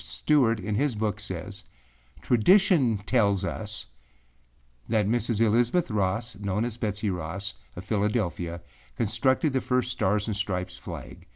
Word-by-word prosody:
Stewart 125 -7 +2
in 105 +2 -3
his 130 +3 +1
book 105 -1 -1
says, 95 0 -6 0.6
âTradition 125 - +4
tells 100 -5 +2
us 110 +1 -5 1.0
that 110 -3 +2
Mrs. 115 -1 0
Elizabeth 120 +7 +2
Ross, 105 +2 -1
known 100 +2 -1
as 120 -3 -3
Betsey 105 -3 -2
Ross, 90 +4 -3 0.2
of 90 - -8
Philadelphia, 100 -6 -1 0.3
constructed 130 +7 +1
the 130 - +1
first 125 -1 0
Stars 105 -4 +1
and 110 - -2
Stripes 90 -3 -3
flag. - - -9
105 Hz, 130 wpm, -27 LUFS, 100-120 Hz, 1.0 s, âTradition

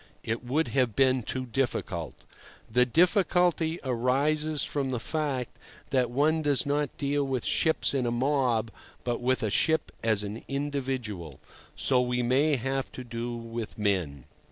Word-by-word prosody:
It 115 +2 -2
would 145 +7 0
have 125 -5 +1
been 130 -1 +4
too 130 +3 -3
difficult. 130 +2 -2 0.5
The 125 +2 +3
difficulty 175 - +2
arises 140 +5 +1
from 140 -2 -2
the 125 -2 -2
fact 140 -2 -2 0.4
that 125 -3 +2
one 150 +6 +2
does 145 -1 +2
not 145 0 -1
deal 145 0 0
with 130 -3 -2
ships 160 -2 +2
in 130 -3 0
a - - +2
mob, 125 -3 +1 0.3
but 120 -1 -2
with 130 0 +1
a 110 - 0
ship 160 +7 +2
as 110 -2 +2
an 105 +3 -6
individual. 130 - -3 0.4
So 130 -2 +4
we 125 0 0
may 140 +5 +3
have 135 +1 -2
to 130 - -7
do 120 0 -4
with 115 -1 -6
men. 90 - -1
130 Hz, 155 wpm, -28 LUFS, 120-145 Hz, 0.5 s, been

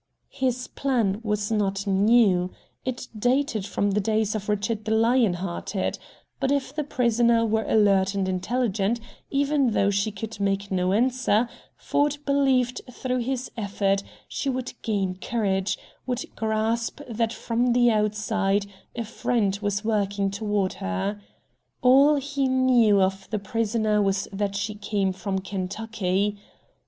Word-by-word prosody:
His 255 -2 -1
plan 230 -7 0
was 210 -1 -1
not 200 -2 0
new. 195 -2 +4 0.3
It 255 -1 -4
dated 245 -2 +1
from 205 0 0
the 205 - +1
days 215 +1 +1
of 210 -1 -4
Richard 210 +1 -1
the 220 0 +1
Lion 225 -3 +3
hearted. 185 +2 -3 0.4
But 270 0 +1
if 280 -2 0
the 300 - -1
prisoner 235 -3 +2
were 220 0 0
alert 195 -2 +3
and 195 -1 0
intelligent, 205 +3 0 0.3
even 280 -3 +2
though 200 0 +3
she 200 +2 0
could 210 +1 -7
make 200 0 -1
no 185 -1 +1
answer, 245 0 +2 0.3
Ford 290 0 0
believed 265 -3 +2
through 255 +1 -2
his 255 +1 -3
effort 200 -2 0 0.3
she 280 - -3
would 255 -1 -3
gain 195 -4 -1
courage, 195 -4 0 0.3
would 250 0 -2
grasp 220 +2 -1
that 230 -1 -1
from 235 +1 0
the 240 -1 +4
outside 210 -1 +1 0.3
a 235 -1 -3
friend 210 -3 0
was 205 0 -1
working 200 -2 0
toward 205 -2 -1
her. 95 - -2 0.6
All 275 +4 +6
he 280 -1 -1
knew 250 -5 +4
of 190 0 0
the 215 - -1
prisoner 215 0 0
was 195 0 0
that 200 0 -2
she 205 +1 -2
came 200 -2 -1
from 190 +1 -3
Kentucky. 200 +1 -2
215 Hz, 140 wpm, -25 LUFS, 200-240 Hz, 0.6 s, All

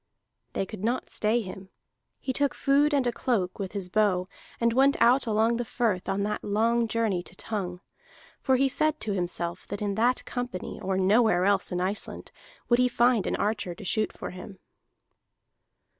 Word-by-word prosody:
They 195 - -1
could 210 -1 -9
not 240 +3 -1
stay 220 +3 +2
him; 190 -1 -9 0.5
he 260 - -3
took 285 +1 +1
food 285 +2 +3
and 280 -3 +2
a 240 - +2
cloak, 220 -7 -1
with 195 -1 -4
his 195 -3 -2
bow, 185 -2 +1 0.3
and 235 0 +2
went 275 +3 +4
out 245 +2 +4
along 225 +2 +2
the 240 - -1
firth 220 -6 -1
on 195 +1 0
that 210 +1 -2
long 230 +3 +1
journey 220 -5 0
to 180 - -12
Tongue. 185 -4 -4 0.6
For 265 - +3
he 270 +2 +3
said 310 +3 +1
to 210 - -1
himself 175 -1 -2
that - - -5
in 205 -1 -1
that 240 +4 +1
company 245 -6 -5
or 190 0 -1
nowhere 190 -1 +3
else 200 0 +1
in 180 - -1
Iceland 190 +3 -2 0.4
would 240 0 +3
he 250 - +5
find 240 -3 +2
an - - 0
archer 205 -4 -1
to 205 - -10
shoot 215 +3 +1
for - - -7
him. 185 +1 -10
215 Hz, 185 wpm, -27 LUFS, 190-240 Hz, 0.6 s, he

